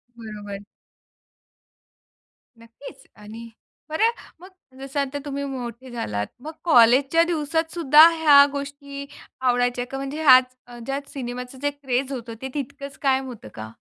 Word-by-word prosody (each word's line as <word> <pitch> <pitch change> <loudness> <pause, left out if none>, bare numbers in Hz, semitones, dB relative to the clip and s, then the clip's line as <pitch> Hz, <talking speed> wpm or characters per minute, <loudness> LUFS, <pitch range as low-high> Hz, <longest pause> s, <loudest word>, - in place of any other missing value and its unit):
बरोबर. 210 -3 -8 2.0
नक्कीच. 230 +4 -13
आणि 220 +2 -11 0.4
बरं 430 +9 +2 0.3
मग 370 +2 -13 0.3
जसं 275 +1 -4
आता 280 +1 -2
तुम्ही 280 0 -4
मोठे 255 -1 -7
झालात. 105 - -3 0.2
मग 310 - -6
कॉलेजच्या 270 +2 +5
दिवसात 320 -1 -1
सुद्धा 310 -1 +7
ह्या 290 -3 +7
गोष्टी 280 0 -7 0.4
आवडायच्या 245 -1 +1
का? 270 - -4
म्हणजे 275 +3 -5
ह्याच 255 -2 +6
अ, 240 - -12
ज्यात 275 +1 -4
सिनेमाचं 250 0 -7
जे 290 - +1
क्रेझ 270 -2 -3
होतं, 240 -3 -6
ते 265 - -5
तितकंच 280 0 -6
कायम 265 -1 +1
होतं 240 - -10
का? 110 0 -8
270 Hz, 135 wpm, -23 LUFS, 245-285 Hz, 2.0 s, सुद्धा